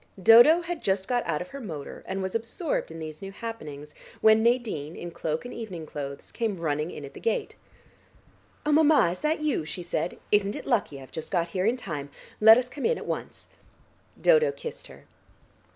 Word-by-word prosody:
Dodo 240 - +8
had 345 -1 -5
just 190 -1 0
got 245 -1 +1
out 150 - -1
of 180 - -17
her 275 - -8
motor 160 - -7
and 190 0 -3
was 190 - -3
absorbed 230 +8 -2
in 165 - -9
these 155 -1 -7
new 195 0 -6
happenings, 155 -10 -7 0.3
when 220 0 +6
Nadine 225 - 0
in 175 - -7
cloak 160 +2 -3
and 245 - -7
evening 185 -9 -6
clothes 140 -2 -7
came 220 -6 -2
running 150 -1 -1
in 150 - -7
at 140 - -11
the - - -10
gate. 225 - -1 1.1
"Oh, 300 - +2
mamma, 300 - +5
is 180 - -6
that 305 +1 0
you?" 295 - 0
she 160 +4 -6
said. 165 0 -2
"Isn't 205 0 +2
it - - -7
lucky; 205 - 0
I've 130 -1 -13
just 160 - -6
got 170 -2 0
here 185 +3 0
in 240 +3 +2
time. 150 - -5 0.3
Let 220 +1 +9
us 250 0 0
come 275 +2 -8
in 475 - +1
at - - -7
once." - - -5 0.7
Dodo 480 -1 +5
kissed 475 +1 -8
her. - - -15
195 Hz, 200 wpm, -27 LUFS, 160-245 Hz, 1.1 s, Let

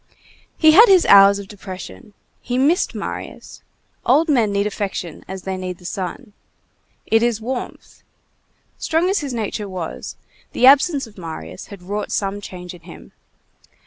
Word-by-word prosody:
He 315 -1 +6
had 430 +9 +8
his 375 -3 +5
hours 200 0 +7
of 200 -1 -8
depression. 205 +1 -10 0.3
He 245 0 -3
missed 305 +8 +2
Marius. - - -7 0.4
Old 325 +2 +3
men 235 -8 +2
need 200 0 0
affection 195 -5 -4
as 190 0 -7
they 190 -1 -4
need 185 -1 -5
the 180 - -18
sun. 200 +6 -6 0.7
It 225 0 +3
is 235 -2 +1
warmth. 245 +3 -6 0.8
Strong 335 +4 +1
as 395 - +1
his 285 -4 -5
nature 210 -2 -4
was, 180 -4 -6 0.4
the 250 - +3
absence 280 +1 +5
of 210 -3 -15
Marius 160 - -8
had 200 -4 -12
wrought 205 +3 -4
some 200 0 -2
change 180 -2 -9
in 175 - -14
him. 170 +1 -13
205 Hz, 155 wpm, -20 LUFS, 185-260 Hz, 0.8 s, had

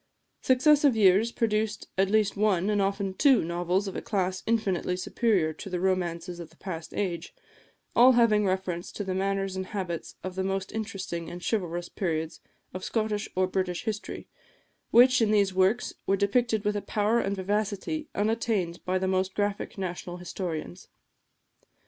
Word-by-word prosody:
Successive 280 +1 +4
years 210 +2 +4
produced 215 -2 -1
at 190 0 +2
least 215 -1 +2
one, 200 -1 +2
and 205 -1 +2
often 195 0 -1
two, 270 +5 +4
novels 175 +3 0
of 195 - -5
a - - -3
class 190 -3 -1
infinitely 195 -5 0
superior 185 -5 +1
to 195 - -8
the 180 -1 -2
romances 175 -1 -1
of 170 -2 -8
the 160 - -22
past 165 -4 -6
age, 175 -4 -3 0.6
all 250 +2 +8
having 230 -3 +4
reference 185 -2 -2
to 205 - -5
the 190 -1 -3
manners 195 0 -1
and 190 0 -4
habits 180 -5 -4
of 185 - -4
the 190 +1 -2
most 195 0 -2
interesting 195 -6 -4
and 175 0 -8
chivalrous 175 -5 -1
periods 160 -3 -3 0.3
of 185 +1 -6
Scottish 215 -1 -1
or 185 0 +3
British 185 -1 -2
history, 215 -1 -5 0.6
which, 250 +1 +6
in 220 - +3
these 200 -3 +3
works, 190 +6 +2
were 195 - +3
depicted 220 +1 +1
with 210 0 +1
a 205 - -1
power 215 +3 +1
and 200 -2 -1
vivacity 205 +10 -2
unattained 210 -5 0
by 185 0 0
the 190 0 -1
most 185 0 0
graphic 205 0 -2
national 180 -1 -5
historians. 170 - -5
195 Hz, 165 wpm, -27 LUFS, 180-215 Hz, 0.6 s, all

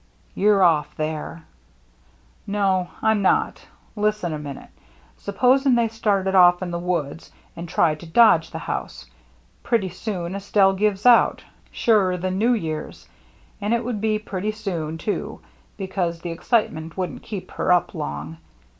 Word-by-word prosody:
" - - -35
You're 205 -1 +4
ofF 160 -4 +2
there." 155 +1 -4 0.5
" 60 0 -34
No, 190 -3 +1
Tm 220 -1 +3
not. 190 - +1 0.3
Listen 210 -5 -1
a 155 - -4
minute. 145 -2 -9 0.5
Suppos 250 +6 +2
ing 265 -3 +4
they 235 -1 +2
started 200 -4 0
off 180 -1 +6
in 175 - -4
the 170 - -3
woods 170 -3 -3 0.2
and 170 0 -7
tried 155 -3 +1
to 170 - -11
dodge 165 -3 +5
the - - -7
house. - - -5 0.6
Pretty 225 -6 0
soon 180 -1 -5
Estelle 200 0 +2
gives 200 +1 -1
out 245 -1 +5 0.2
— - - -33
surer 200 -6 +2
than 185 +1 -2
New 240 +3 +3
Year's. 160 -7 -5 0.5
And 210 +3 +1
it 235 0 -3
would 235 -4 -3
be 215 -1 +1
pretty 210 0 -4
soon, 170 -7 -4
too, 205 +5 -4 0.4
because 185 -4 -3
the 175 - -5
excitement 165 -4 -1
wouldn't 180 -6 -4
keep 190 -4 -7
her - - -1
up 180 -2 +2
long. 75 +3 -5
185 Hz, 160 wpm, -22 LUFS, 165-210 Hz, 0.6 s, off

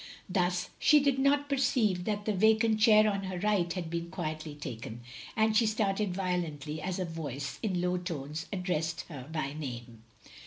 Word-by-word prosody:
Thus 180 -1 0
she 300 - +6
did 280 -2 +2
not 285 +1 +3
perceive 225 -9 +1
that 205 -1 -2
the 215 - +1
vacant 220 +2 +4
chair 215 -1 +6
on 200 -2 -1
her 185 -1 -4
right 190 -3 +1
had 175 -2 -3
been 170 0 -3
quietly 155 -3 -4
taken, 120 -5 -7 0.3
and 220 0 +3
she 225 0 +5
started 210 -2 0
violently 160 -5 -2
as 185 0 -2
a 185 - -1
voice 145 -5 -5
in 185 -6 0
low 180 0 +1
tones 160 -1 -5
ad 190 -3 -3
dressed 165 -1 -1
her 140 -3 -8
by 155 -3 -2
name. 120 -6 -7
180 Hz, 180 wpm, -30 LUFS, 155-215 Hz, 0.3 s, she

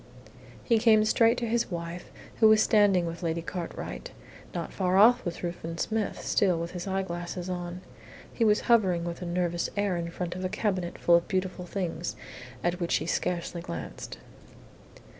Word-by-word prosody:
He 230 -3 +3
came 215 -1 +5
straight 230 +2 +4
to 235 - -2
his 230 +1 0
wife, 170 0 -5 0.3
who 220 - +7
was 215 0 +6
standing 205 -5 +4
with 170 +1 -5
Lady 165 -1 -1
Cartwright. 180 - -6 0.4
Not - - -5
far 185 -1 +1
off 245 +5 +6
was 175 -1 -5
Ruthven 170 -1 -4
Smith, 220 +3 -2
still 185 -4 +2
with 170 +1 -4
his 180 +1 -6
eyeglasses 180 -1 -3
on. 175 0 -5 0.5
He 235 - 0
was 210 -1 +4
hovering 190 -8 +3
with 170 +1 -5
a 180 - -4
nervous 175 -1 -1
air 200 -3 +1
in 170 0 -3
front 175 0 -4
of 185 - -5
a 185 - -1
cabinet 185 -4 -2
full 175 - +3
of 170 - -3
beautiful 185 -1 -2
things, 175 -3 -3 0.5
at 175 +1 0
which 170 -1 +1
he - - -1
scarcely 170 0 -2
glanced. 85 - -7
180 Hz, 175 wpm, -28 LUFS, 170-205 Hz, 0.5 s, who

